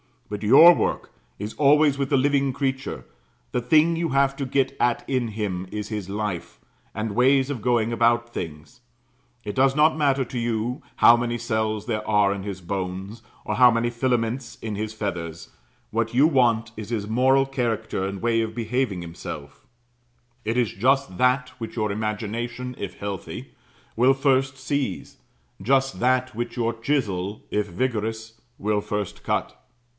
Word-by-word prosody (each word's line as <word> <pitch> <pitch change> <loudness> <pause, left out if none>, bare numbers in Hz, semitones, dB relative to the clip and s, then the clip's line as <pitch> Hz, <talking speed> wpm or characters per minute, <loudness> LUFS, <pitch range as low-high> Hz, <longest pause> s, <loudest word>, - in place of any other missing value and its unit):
But 105 - -4
your 140 +11 +9
work - - -2 0.3
is 105 +2 -5
always 145 0 +4
with 135 -1 -1
the 140 - +3
living 140 0 +2
creature; 135 0 -3 0.5
the - - 0
thing 155 +7 +4
you 165 0 -1
have 135 0 +2
to 140 - -2
get 135 +1 0
at 120 -1 +1
in 130 -3 0
him 100 -4 -3
is 105 -1 -4
his 105 -4 -4
life, 105 -3 -4 0.4
and 110 +1 -2
ways 130 +3 +3
of 125 -6 -4
going 120 0 +1
about 120 0 +2
things. 75 +1 -7 0.6
It 105 - -4
does 135 +3 +3
not 155 +1 +4
matter 140 -3 +2
to 120 +1 -5
you 120 +3 -2
how 120 - +7
many 120 0 -1
cells 110 -2 -1
there 110 -3 -3
are 105 -2 +3
in 100 - -5
his 95 -2 -6
bones, 95 +4 -5 0.2
or 105 - -2
how 125 +2 +7
many 115 0 +1
filaments 120 0 -1
in 110 -2 -4
his 110 +1 -4
feathers; 85 -6 -5 0.4
what 115 +1 -1
you 135 +4 +6
want 120 -7 +2
is 110 -1 -7
his 110 -4 -2
moral 130 +4 +3
character 115 -7 -2
and 100 -1 -6
way 115 -1 +2
of 110 0 -4
behaving 120 -4 -1
himself; 75 -4 -9 0.8
it 115 +3 -1
is 120 -4 +2
just 130 -2 +1
that 125 0 +2
which 115 -1 -6
your 105 -3 -1
imagination, 110 +4 -3
if 100 - -5
healthy, 100 -3 -6 0.4
will 125 +3 +5
first 135 -1 +1
seize 135 -5 -3 0.4
just 135 +5 +1
that 130 +1 +1
which 120 +1 -4
your 115 -1 0
chisel, 110 -6 -2
if 105 0 0
vigorous, 110 +2 -3 0.2
will 105 0 0
first 105 -2 -4
cut. - - -2
115 Hz, 165 wpm, -24 LUFS, 105-130 Hz, 0.8 s, your